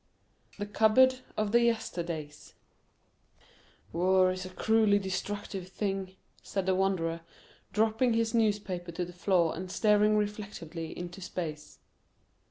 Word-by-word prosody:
THE 205 Hz, -, -3 dB
CUPBOARD 220 Hz, +5 st, +4 dB, 0.2 s
OF 215 Hz, -1 st, 0 dB
THE 235 Hz, +1 st, +5 dB
YESTERDAYS 170 Hz, -10 st, -2 dB, 1.4 s
"War 185 Hz, +2 st, +4 dB
is 185 Hz, 0 st, -5 dB
a -, -, -9 dB
cruelly 215 Hz, +2 st, +3 dB
destructive 195 Hz, 0 st, -4 dB
thing," 195 Hz, -1 st, -3 dB, 0.3 s
said 195 Hz, -2 st, -3 dB
the 190 Hz, -, +2 dB
Wanderer, 180 Hz, -3 st, 0 dB, 0.5 s
dropping 225 Hz, +3 st, +2 dB
his 225 Hz, 0 st, +1 dB
newspaper 205 Hz, -6 st, 0 dB
to 175 Hz, +2 st, -2 dB
the 180 Hz, -, -11 dB
floor 175 Hz, -2 st, +2 dB
and 185 Hz, +2 st, -6 dB
staring 210 Hz, 0 st, +4 dB
reflectively 200 Hz, -6 st, -4 dB
into 175 Hz, +2 st, -7 dB
space. 155 Hz, -4 st, -6 dB
195 Hz, 120 wpm, -30 LUFS, 180-215 Hz, 1.4 s, THE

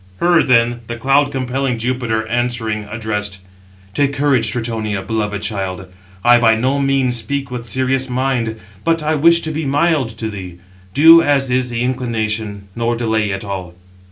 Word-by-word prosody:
Her, 175 Hz, -1 st, +4 dB
then, 120 Hz, -2 st, +2 dB
the 120 Hz, -, -4 dB
cloud 135 Hz, +4 st, +2 dB
compelling 130 Hz, -1 st, -2 dB
Jupiter, 115 Hz, -2 st, -1 dB
answering, 115 Hz, -2 st, -2 dB
addressed: 105 Hz, -2 st, -4 dB, 0.6 s
"Take 140 Hz, +2 st, +1 dB
courage, 135 Hz, -5 st, +2 dB
Tritonia, 110 Hz, -4 st, -3 dB
beloved 105 Hz, 0 st, -3 dB
child: 95 Hz, -3 st, -3 dB, 0.4 s
I 120 Hz, 0 st, +6 dB
by 115 Hz, -2 st, +4 dB
no 130 Hz, +5 st, 0 dB
means 135 Hz, -3 st, +2 dB
speak 140 Hz, +2 st, -4 dB
with 120 Hz, -2 st, -5 dB
serious 130 Hz, +1 st, 0 dB
mind, 125 Hz, -3 st, -1 dB, 0.2 s
but 165 Hz, -1 st, +1 dB
I 155 Hz, +1 st, +1 dB
wish 170 Hz, +3 st, +4 dB
to 160 Hz, -, -3 dB
be 155 Hz, +1 st, -3 dB
mild 145 Hz, -1 st, +1 dB
to 110 Hz, -, -3 dB
thee. 90 Hz, -4 st, -8 dB, 0.4 s
Do 165 Hz, +3 st, +8 dB
as 140 Hz, -4 st, +1 dB
is 125 Hz, 0 st, +1 dB
the 120 Hz, 0 st, -2 dB
inclination, 110 Hz, -5 st, -2 dB
nor 115 Hz, 0 st, 0 dB
delay 110 Hz, -3 st, 0 dB
at 95 Hz, +1 st, -4 dB
all." 90 Hz, -3 st, -6 dB
120 Hz, 160 wpm, -17 LUFS, 110-135 Hz, 0.6 s, Do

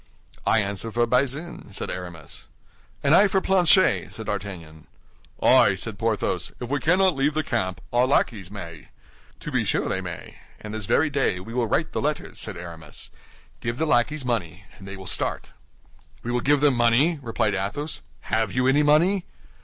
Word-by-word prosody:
"I 110 Hz, -1 st, +4 dB
answer 100 Hz, +3 st, -4 dB
for 120 Hz, +2 st, +2 dB
Bazin," 135 Hz, +3 st, -1 dB
said -, -, -3 dB
Aramis. 85 Hz, -5 st, -8 dB, 0.6 s
"And 140 Hz, +1 st, +4 dB
I 200 Hz, +4 st, +7 dB
for 190 Hz, 0 st, +2 dB
Planchet," 185 Hz, -1 st, +4 dB
said 110 Hz, -, -7 dB
D'Artagnan. 90 Hz, -7 st, -6 dB, 0.6 s
"Ay," -, -, +6 dB
said -, -, -5 dB
Porthos, -, -, -1 dB
"if 125 Hz, +1 st, -6 dB
we 145 Hz, -, +1 dB
cannot 180 Hz, +5 st, +3 dB
leave 140 Hz, +2 st, +1 dB
the 155 Hz, -, +1 dB
camp, 95 Hz, -9 st, -2 dB
our 125 Hz, +1 st, +4 dB
lackeys 105 Hz, -8 st, 0 dB
may." 85 Hz, -7 st, -9 dB, 0.5 s
"To -, -, -6 dB
be -, -, +1 dB
sure -, -, 0 dB
they 95 Hz, -, -1 dB
may; 90 Hz, -3 st, -8 dB, 0.2 s
and 105 Hz, 0 st, -8 dB
this 110 Hz, -2 st, -4 dB
very 155 Hz, +1 st, +2 dB
day 135 Hz, -10 st, +1 dB
we 115 Hz, +5 st, -9 dB
will 120 Hz, -2 st, 0 dB
write 160 Hz, +9 st, 0 dB
the -, -, -2 dB
letters," 150 Hz, +1 st, -2 dB
said 110 Hz, -4 st, -2 dB
Aramis. 85 Hz, -4 st, -7 dB, 0.5 s
"Give 115 Hz, +1 st, -3 dB
the 160 Hz, -, 0 dB
lackeys 140 Hz, +1 st, +1 dB
money, 100 Hz, -6 st, -2 dB
and 95 Hz, -, -11 dB
they 95 Hz, 0 st, -7 dB
will 95 Hz, -, -10 dB
start." -, -, -2 dB, 0.7 s
"We 120 Hz, -, -3 dB
will 125 Hz, 0 st, 0 dB
give 145 Hz, +1 st, +3 dB
them 145 Hz, -2 st, +5 dB
money?" 125 Hz, +7 st, +3 dB
replied 110 Hz, -3 st, 0 dB
Athos. 100 Hz, +11 st, -3 dB, 0.2 s
"Have 110 Hz, -2 st, -1 dB
you 125 Hz, +3 st, 0 dB
any 140 Hz, +3 st, +4 dB
money?" 170 Hz, +6 st, +3 dB
120 Hz, 180 wpm, -24 LUFS, 95-145 Hz, 0.7 s, I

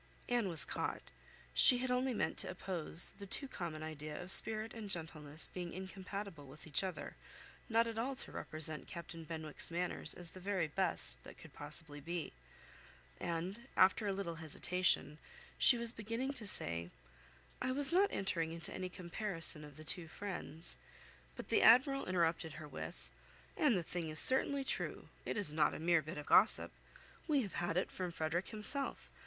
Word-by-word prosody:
Anne 240 Hz, -5 st, -1 dB
was 165 Hz, -3 st, +1 dB
caught. -, -, -4 dB, 0.5 s
She 250 Hz, -, +7 dB
had 250 Hz, 0 st, -3 dB
only 255 Hz, +1 st, 0 dB
meant 230 Hz, -, -2 dB
to -, -, +4 dB
oppose 175 Hz, -2 st, +8 dB
the 200 Hz, -, -8 dB
too 275 Hz, -, 0 dB
common 165 Hz, -9 st, -7 dB
idea 155 Hz, -1 st, -8 dB
of 180 Hz, +1 st, 0 dB
spirit 220 Hz, +1 st, +2 dB
and 220 Hz, -3 st, -9 dB
gentleness 155 Hz, -3 st, 0 dB
being 175 Hz, -2 st, -7 dB
incompatible 190 Hz, -3 st, -8 dB
with 145 Hz, +4 st, -14 dB
each 155 Hz, +2 st, -3 dB
other, 190 Hz, -1 st, -7 dB, 0.5 s
not 230 Hz, 0 st, +2 dB
at 225 Hz, -1 st, -5 dB
all 265 Hz, +4 st, -3 dB
to -, -, -10 dB
represent 155 Hz, 0 st, -6 dB
Captain 165 Hz, -1 st, -9 dB
Benwick's 155 Hz, -2 st, -6 dB
manners 175 Hz, +1 st, -3 dB
as 175 Hz, -2 st, -7 dB
the 185 Hz, -, -12 dB
very 185 Hz, -3 st, -2 dB
best 185 Hz, +5 st, 0 dB
that -, -, -13 dB
could 160 Hz, -4 st, -15 dB
possibly 145 Hz, 0 st, -6 dB
be; 165 Hz, +1 st, -6 dB, 0.9 s
and, 185 Hz, +9 st, -5 dB
after 190 Hz, +3 st, +3 dB
a -, -, 0 dB
little 190 Hz, -4 st, -5 dB
hesitation, 165 Hz, -1 st, -1 dB, 0.4 s
she 245 Hz, -, +5 dB
was 235 Hz, 0 st, -3 dB
beginning 230 Hz, +5 st, -5 dB
to 225 Hz, -6 st, -6 dB
say, 85 Hz, -, 0 dB, 0.7 s
"I 255 Hz, -, -2 dB
was 285 Hz, +4 st, +3 dB
not 395 Hz, +3 st, +3 dB
entering 165 Hz, -4 st, -3 dB
into 165 Hz, 0 st, -8 dB
any 185 Hz, -1 st, -6 dB
comparison 175 Hz, -3 st, -5 dB
of 150 Hz, -2 st, -14 dB
the 155 Hz, -, -11 dB
two 165 Hz, +2 st, -2 dB
friends," 175 Hz, -3 st, -4 dB, 0.6 s
but -, -, -10 dB
the -, -, +2 dB
Admiral 270 Hz, +4 st, +4 dB
interrupted 165 Hz, -3 st, -1 dB
her 155 Hz, -1 st, -10 dB
with— -, -, -10 dB, 0.4 s
"And 300 Hz, -, +2 dB
the 175 Hz, -, -3 dB
thing 165 Hz, -1 st, -5 dB
is 155 Hz, -, +7 dB
certainly 275 Hz, +1 st, +10 dB
true. -, -, -5 dB, 0.2 s
It -, -, -4 dB
is 195 Hz, -8 st, -3 dB
not 155 Hz, -1 st, +1 dB
a -, -, -7 dB
mere 170 Hz, 0 st, +2 dB
bit 155 Hz, +2 st, -9 dB
of 150 Hz, -, -7 dB
gossip. 205 Hz, +7 st, +3 dB, 0.6 s
We 290 Hz, -5 st, +1 dB
have 175 Hz, -4 st, -4 dB
it 185 Hz, -, -2 dB
from 180 Hz, -2 st, -5 dB
Frederick 165 Hz, +2 st, -3 dB
himself. 235 Hz, +6 st, 0 dB
180 Hz, 175 wpm, -35 LUFS, 160-220 Hz, 0.9 s, certainly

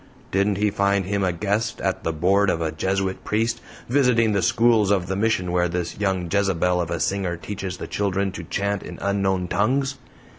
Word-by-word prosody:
Didn't 100 Hz, +1 st, +1 dB
he 105 Hz, 0 st, +1 dB
find 100 Hz, -1 st, +1 dB
him 100 Hz, +1 st, -1 dB
a 90 Hz, -, +2 dB
guest 105 Hz, +6 st, -1 dB
at -, -, -2 dB
the 80 Hz, -, 0 dB
board 95 Hz, +5 st, +2 dB
of 80 Hz, -, 0 dB
a 80 Hz, -1 st, -1 dB
Jesuit 95 Hz, +4 st, -2 dB
priest, 115 Hz, +2 st, 0 dB, 0.3 s
visiting 125 Hz, -4 st, +3 dB
the 100 Hz, -2 st, +1 dB
schools 115 Hz, -3 st, +3 dB
of 95 Hz, -3 st, +2 dB
the 95 Hz, +1 st, -2 dB
Mission 100 Hz, -4 st, 0 dB
where 90 Hz, 0 st, +2 dB
this 85 Hz, +1 st, -3 dB
young 95 Hz, -3 st, 0 dB
Jezebel 90 Hz, -3 st, +1 dB
of 85 Hz, -, -3 dB
a 85 Hz, -, -2 dB
singer 95 Hz, -2 st, -1 dB
teaches 95 Hz, 0 st, -5 dB
the -, -, -6 dB
children 100 Hz, -1 st, -1 dB
to 85 Hz, -, -7 dB
chant 100 Hz, +4 st, -2 dB
in -, -, -8 dB
unknown 95 Hz, -2 st, 0 dB
tongues? 135 Hz, +8 st, 0 dB
100 Hz, 195 wpm, -23 LUFS, 90-105 Hz, 0.3 s, visiting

